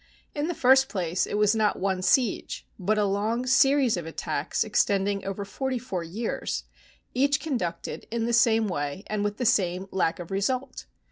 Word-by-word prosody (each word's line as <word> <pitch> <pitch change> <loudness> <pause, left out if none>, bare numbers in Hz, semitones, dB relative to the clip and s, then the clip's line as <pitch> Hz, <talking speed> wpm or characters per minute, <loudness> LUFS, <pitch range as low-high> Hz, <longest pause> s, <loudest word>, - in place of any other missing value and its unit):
In 295 +1 -2
the 350 - -2
first 265 +1 +5
place, 180 -3 -1
it - - -3
was 210 0 +4
not 215 -1 +2
one 190 -1 -1
siege, 235 +3 +1
but 210 +4 +1
a 210 - +3
long 215 +5 0
series 265 -2 +4
of 170 -2 -5
attacks 155 0 -2
extending 200 -2 +1
over 195 +1 -4
forty 265 +5 -3
four 195 -8 -4
years, 170 - -3 0.5
each 275 +2 +2
conducted 235 - -4
in 230 0 -1
the 235 - -1
same 225 -2 +4
way 145 0 -3
and 215 -1 -2
with 205 +1 -2
the 250 - -2
same 190 -5 +1
lack 175 -3 0
of 175 0 -8
result. 250 +7 -2
210 Hz, 180 wpm, -26 LUFS, 190-245 Hz, 0.5 s, first